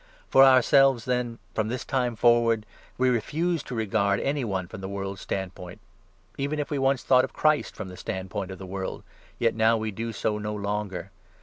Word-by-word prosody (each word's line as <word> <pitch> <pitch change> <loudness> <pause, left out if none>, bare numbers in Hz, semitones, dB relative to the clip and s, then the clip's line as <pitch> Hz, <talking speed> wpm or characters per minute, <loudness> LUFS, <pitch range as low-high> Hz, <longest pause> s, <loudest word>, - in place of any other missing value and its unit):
For 135 - +7
ourselves, 135 -1 +5
then, 125 -2 -1 0.2
from 110 -1 0
this 125 +2 -4
time 125 -3 0
forward, 115 -1 +3 0.3
we 130 0 +3
refuse 160 +8 0
to 125 - -6
16 - - -4
regard 100 -2 +1
any 140 0 -1
one 95 -5 -2
from 95 - -9
the 95 - -5
world's 100 -1 -5
standpoint. 90 0 -5 0.6
Even 140 +2 -1
if 150 0 -3
we 145 - 0
once 135 -1 +1
thought 130 -1 +5
of - - -4
Christ 155 -1 +1
from 105 - -6
the 90 - -9
standpoint 95 +1 -4
of 95 - -7
the 95 - -8
world, 95 0 -5 0.3
yet 115 -1 +2
now 110 +1 +3
we 110 0 -3
do 115 +3 -4
so 105 -1 -1
no 105 0 -3
longer. 100 -3 -3
110 Hz, 200 wpm, -26 LUFS, 100-130 Hz, 0.6 s, For